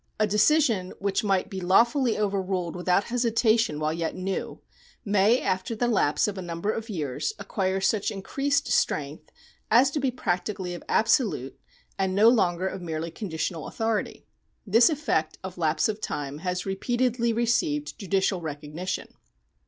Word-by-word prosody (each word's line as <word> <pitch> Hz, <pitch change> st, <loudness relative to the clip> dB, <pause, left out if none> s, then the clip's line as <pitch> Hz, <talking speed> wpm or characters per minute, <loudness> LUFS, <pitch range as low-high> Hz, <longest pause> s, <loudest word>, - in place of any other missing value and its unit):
A 215 Hz, -, +4 dB
decision 210 Hz, -2 st, +2 dB
which 195 Hz, +1 st, -1 dB
might 195 Hz, -3 st, +1 dB
be 190 Hz, -1 st, -6 dB
lawfully 235 Hz, +7 st, +3 dB
overruled 190 Hz, -4 st, -1 dB
without 180 Hz, +2 st, +2 dB
hesita 230 Hz, -1 st, +2 dB
tion 155 Hz, -9 st, 0 dB
while 155 Hz, 0 st, 0 dB
yet 165 Hz, 0 st, -3 dB
new, 185 Hz, +1 st, -4 dB, 0.5 s
may 210 Hz, +4 st, +4 dB
after 185 Hz, +4 st, -2 dB
the 240 Hz, +2 st, 0 dB
lapse 200 Hz, -10 st, +2 dB
of 200 Hz, -2 st, -4 dB
a -, -, -4 dB
number 175 Hz, +3 st, -2 dB
of 225 Hz, +1 st, -5 dB
years 155 Hz, -, -3 dB
acquire 190 Hz, -1 st, -1 dB
such 195 Hz, +2 st, +1 dB
increased 275 Hz, +8 st, -1 dB
strength 150 Hz, -9 st, -1 dB, 0.4 s
as 255 Hz, +5 st, +5 dB
to 295 Hz, -, -1 dB
be 270 Hz, -1 st, +1 dB
practically 185 Hz, -5 st, -2 dB
of 175 Hz, -, -8 dB
absolute 220 Hz, -, +1 dB, 0.4 s
and 190 Hz, -1 st, 0 dB
no 215 Hz, +3 st, +7 dB
longer 185 Hz, -6 st, +2 dB
of 190 Hz, 0 st, -5 dB
merely 165 Hz, -1 st, -4 dB
conditional 165 Hz, -4 st, -4 dB
authority. 225 Hz, -1 st, -2 dB, 0.4 s
This 230 Hz, +3 st, +5 dB
effect 275 Hz, -, -1 dB
of 185 Hz, -1 st, -7 dB
lapse 155 Hz, -1 st, +2 dB
of 215 Hz, 0 st, -4 dB
time 145 Hz, 0 st, -4 dB
has 180 Hz, +1 st, -3 dB
repeatedly 235 Hz, +4 st, 0 dB
received 265 Hz, +7 st, 0 dB
judicial 195 Hz, -2 st, 0 dB
recognition. 155 Hz, +3 st, -5 dB
195 Hz, 150 wpm, -26 LUFS, 175-230 Hz, 0.5 s, no